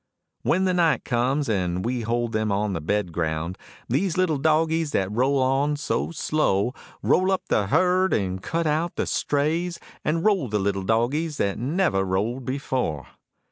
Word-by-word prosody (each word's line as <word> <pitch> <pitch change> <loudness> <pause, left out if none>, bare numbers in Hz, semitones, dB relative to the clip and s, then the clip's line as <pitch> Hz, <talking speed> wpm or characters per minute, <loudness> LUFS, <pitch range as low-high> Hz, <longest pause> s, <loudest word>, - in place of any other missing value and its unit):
When 190 +3 +2
the 185 - +2
night 165 -7 +2
comes 130 +4 0
on 110 - +1
and 90 0 -1
we 125 0 -1
hold 120 +1 -1
them 110 -1 0
on 100 0 0
the 80 - -3
bedground, 85 -2 -1 0.3
These 170 +8 0
little 170 -6 +2
dogies 160 +1 +1
that 95 0 0
roll 130 +5 +2
on 135 +3 +2
so 145 - -1
slow; 130 -9 0 0.3
Roll 185 +1 +3
up 190 - 0
the 100 - +2
herd 185 - +3
and 95 -2 -1
cut 165 - -2
out 160 +3 0
the - - -1
strays, 165 +4 0 0.2
And 165 +2 0
roll 195 -10 +3
the 105 -1 0
little 100 -1 0
dogies 130 - 0
that 100 +1 -1
never 140 - +1
rolled 105 +7 -1
before. 130 - -2
130 Hz, 170 wpm, -24 LUFS, 100-160 Hz, 0.3 s, Roll